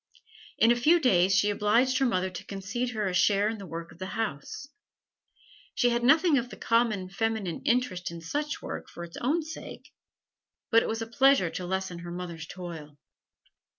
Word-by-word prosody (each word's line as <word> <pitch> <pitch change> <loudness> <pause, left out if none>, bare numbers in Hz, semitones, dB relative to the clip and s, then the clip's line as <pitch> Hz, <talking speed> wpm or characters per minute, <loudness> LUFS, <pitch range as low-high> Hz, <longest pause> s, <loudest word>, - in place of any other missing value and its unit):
In 230 - +5
a - - +4
few 305 +9 +4
days 190 - +4
she 205 +2 +3
obliged 235 +6 +2
her 270 - +3
mother 185 -4 0
to 185 +2 -8
concede 200 +6 -3
to 245 - -5
her 215 -1 -1
a 185 - -2
share 200 +3 +3
in 220 0 -3
the 195 - -8
work 165 0 -7
of - - -17
the 185 - -4
house. 210 - -4 1.1
She 245 - +3
had 240 0 0
nothing 310 +2 +5
of 245 +1 -5
the - - -10
common 230 -5 +1
feminine 200 -3 -2
interest 235 -7 0
in 170 0 -8
such 290 - -3
work - - -6
for 170 - -8
its 170 -1 -9
own 310 +7 0
sake, 315 +1 -10 0.8
but 230 0 +6
it - - -3
was 225 0 -2
a - - -5
pleasure 235 -5 +3
to 180 - -5
lessen 190 -1 -3
her 175 0 -8
mother's 170 -2 -6
toil. 165 -6 -8
205 Hz, 195 wpm, -28 LUFS, 180-240 Hz, 1.1 s, but